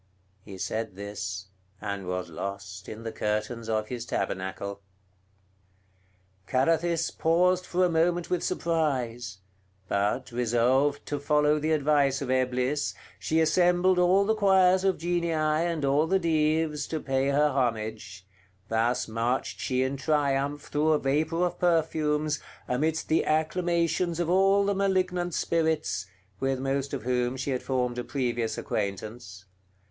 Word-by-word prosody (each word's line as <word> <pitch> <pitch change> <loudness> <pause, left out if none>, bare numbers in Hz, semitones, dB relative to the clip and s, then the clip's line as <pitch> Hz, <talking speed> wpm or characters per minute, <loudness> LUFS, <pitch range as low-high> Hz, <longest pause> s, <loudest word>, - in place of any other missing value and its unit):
He 95 -1 -10
said 110 +1 -3
this, 100 -1 -6 0.3
and 100 -3 -4
was 90 0 -3
lost 95 +2 -6
in 110 +1 -8
the 115 - -4
curtains 110 +2 -2
of 110 -1 -1
his 120 -2 -4
tabernacle. 100 -1 -3 1.7
Carathis 165 +5 +1
paused 180 +3 +2
for 180 +1 +2
a - - +2
moment 170 +1 +1
with 180 - -1
surprise; 125 - -1 0.5
but, 105 +7 -1
resolved 125 +4 +1
to 145 - -3
follow 150 +1 +2
the 155 +2 -1
advice 145 -3 +2
of 135 -2 -3
Eblis, 130 +2 0 0.2
she 160 - 0
assembled 180 +3 +3
all 185 +3 +4
the 220 - +2
choirs 190 -3 +4
of 190 -1 +2
Genii, 170 0 -1
and 155 0 0
all 145 +3 +2
the 190 +3 +3
Dives, 155 -3 +1
to 160 - -3
pay 135 -1 0
her 145 +2 +3
homage; 110 -7 -2 0.4
thus 115 +2 +1
marched 115 +3 -2
she 130 0 0
in 135 +1 -2
triumph 145 0 0
through 155 +2 +1
a - - +4
vapor 155 +5 +1
of 175 - -4
perfumes, 155 -3 +1 0.3
amidst 155 +6 0
the 160 - +2
acclamations 170 +2 0
of 175 0 0
all 195 +2 +4
the 200 - +1
malignant 185 -3 0
spirits, 160 - 0 0.3
with 135 -1 0
most 135 +1 -1
of 135 -6 -4
whom 125 +1 0
she 130 +2 -2
had 130 - -1
formed 125 -2 -1
a - - -2
previous 120 -5 -2
acquaintance. 100 -1 -4
140 Hz, 140 wpm, -27 LUFS, 115-165 Hz, 1.7 s, all